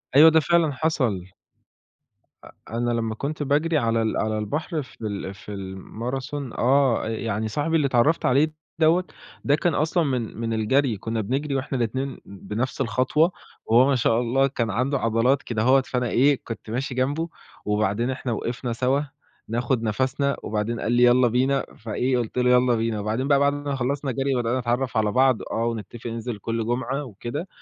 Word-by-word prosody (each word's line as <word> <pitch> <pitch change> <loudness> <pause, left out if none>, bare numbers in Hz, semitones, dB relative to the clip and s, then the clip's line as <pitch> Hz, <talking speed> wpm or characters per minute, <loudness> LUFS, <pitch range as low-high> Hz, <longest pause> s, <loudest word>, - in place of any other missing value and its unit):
أيوه، 160 +3 +9
ده 160 0 +5
فعلًا 170 -1 +2
حصل. 120 - -1 1.1
أ - - -13 0.2
أنا 120 +1 -1
لمّا 115 -2 -1
كنت 145 +4 -3
باجري 150 +3 +1
على 115 -3 +1
ال 110 - 0
على 110 0 0
البحر 150 - -2
في 135 0 -17
ال 100 -2 -4
في 100 +2 -11
ال 95 -1 -6
Marathon 130 +6 -5
آه 130 -2 +3
يعني 110 -1 -2
صاحبي 145 +8 -1
اللي 150 -4 +3
اتعرّفت 130 +6 +2
عليه 145 +5 +3 0.3
دوّة 165 +3 +4 0.4
ده 145 - +3
كان 160 +1 0
أصلًا 160 +3 +1
من 125 -6 -2
من 115 -1 -2
الجري 115 +2 +1
كنا 110 +3 -3
بنجري 135 +6 -2
وإحنا 135 0 -2
الاتنين 130 +3 -2
بنفس 110 +7 -4
الخطوة، 130 +8 +2 0.3
وهو 120 +4 +5
ما 140 - +3
شاء 115 -1 +2
الله 130 +3 +2
كان 120 -4 -2
عنده 130 +6 0
عضلات 115 +5 +2
كدهوَّة، 125 +4 +3
فأنا 125 -2 -2
إيه 140 +2 +3
كنت 115 -1 -8
ماشي 125 +3 -3
جنبه، 145 +6 0 0.4
وبعدين 105 +3 0
إحنا 130 -1 -4
وقفنا 120 +2 -3
سوا 130 +4 +1 0.5
ناخُد 120 +1 -1
نفَسنا، 130 +5 0
وبعدين 110 +2 -2
قال 115 - -1
لي 120 0 +4
يالّا 125 +1 +5
بينا، 130 +3 +1
فإيه 125 +4 -1
قُلت 120 0 -3
له 125 0 +3
يالّا 125 -1 +4
بينا، 115 -1 -1
وبعدين 110 +6 -1
بقى 140 -1 +4
بعد 140 0 +3
ما 145 -1 -3
خلصنا 135 +2 -1
جري، 135 +1 0
بدأنا 120 +1 0
نتعرف 120 0 -1
على 105 -1 +2
بعض، 130 0 +3
آه، 115 +1 0
ونتفق 115 +1 -5
ننزل 115 -1 -4
كل 115 +2 -3
جمعة 130 +4 -2
وكده، 125 - -6
125 Hz, 180 wpm, -24 LUFS, 115-140 Hz, 1.1 s, أيوه